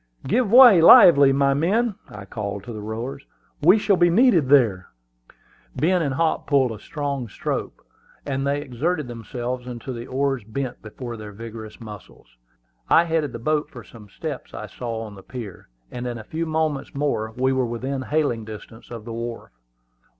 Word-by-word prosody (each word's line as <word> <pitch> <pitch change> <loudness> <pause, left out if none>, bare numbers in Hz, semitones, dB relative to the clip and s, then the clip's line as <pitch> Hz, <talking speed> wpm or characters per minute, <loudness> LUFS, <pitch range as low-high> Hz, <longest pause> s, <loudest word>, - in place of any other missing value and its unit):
"Give 220 - +1
way, 240 -8 +9
lively, 145 -4 +8
my 140 0 +2
men!" 205 +11 +1 0.2
I 105 -1 -10
called 100 -2 -5
to 120 - -8
the 105 - -7
rowers. 120 +6 -6 0.4
"We 180 +8 +6
shall 205 -2 +2
be 175 0 +4
needed 175 - +4
there." 110 -10 +3 0.9
Ben 180 +3 +2
and 140 -4 -1
Hop 165 +2 0
pulled 135 -4 +2
a 110 - -7
strong 140 -4 -4
stroke, - - -5 0.4
and 135 -1 -2
they 145 +1 0
exerted 150 +3 -2
themselves 120 +1 -5
until 125 +1 -6
the 120 +1 -7
oars 135 -2 -1
bent 120 +4 -5
before 115 +2 -8
their 105 -1 -9
vigorous 110 0 -9
muscles. 105 - -13 0.5
I 165 - +6
headed 160 -4 -1
the - - -6
boat 150 +5 -1
for 120 -3 -11
some 105 0 -15
steps - - -7
I - - -6
saw 115 -2 -6
on 105 -2 -9
the 95 - -12
pier, 105 - -9 0.2
and 125 0 -5
in 120 -1 -4
a 110 - -9
few 160 +8 -4
moments 155 -4 -2
more 135 -6 -1
we 130 +1 +1
were 130 -2 0
within 130 +3 -4
hailing 140 -5 -1
distance 110 +1 -11
of 115 -3 -8
the 115 - -6
wharf. 115 0 -6
130 Hz, 180 wpm, -23 LUFS, 115-150 Hz, 0.9 s, way